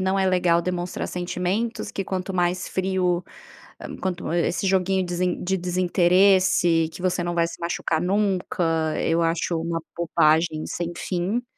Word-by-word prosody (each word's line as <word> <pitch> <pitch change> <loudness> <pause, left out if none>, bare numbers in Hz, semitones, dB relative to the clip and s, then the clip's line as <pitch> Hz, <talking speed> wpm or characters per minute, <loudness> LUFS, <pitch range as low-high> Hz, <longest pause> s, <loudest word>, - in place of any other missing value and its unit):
não 190 +1 +1
é 190 -1 +2
legal, 175 -2 +2
demonstrar 180 0 -3
sentimentos, 180 +6 -2
que 195 - -4
quanto 190 +1 -3
mais 180 0 0
frio, 185 -2 0 0.8
quanto, 180 -3 -3
esse 175 +3 0
joguinho 190 0 +1
de 180 +1 -1
desinteresse, 180 -1 +3
que 175 - -10
você 180 -1 0
não 175 0 -2
vai 170 -1 +2
se - - -9
machucar 170 -1 -1
nunca, 190 -1 0 0.4
eu 165 +1 +1
acho 165 +1 0
uma 165 0 -2 0.2
bobagem 160 -1 +2
sem 175 -1 -3
fim. 190 +7 -2
180 Hz, 140 wpm, -24 LUFS, 170-190 Hz, 0.8 s, desinteresse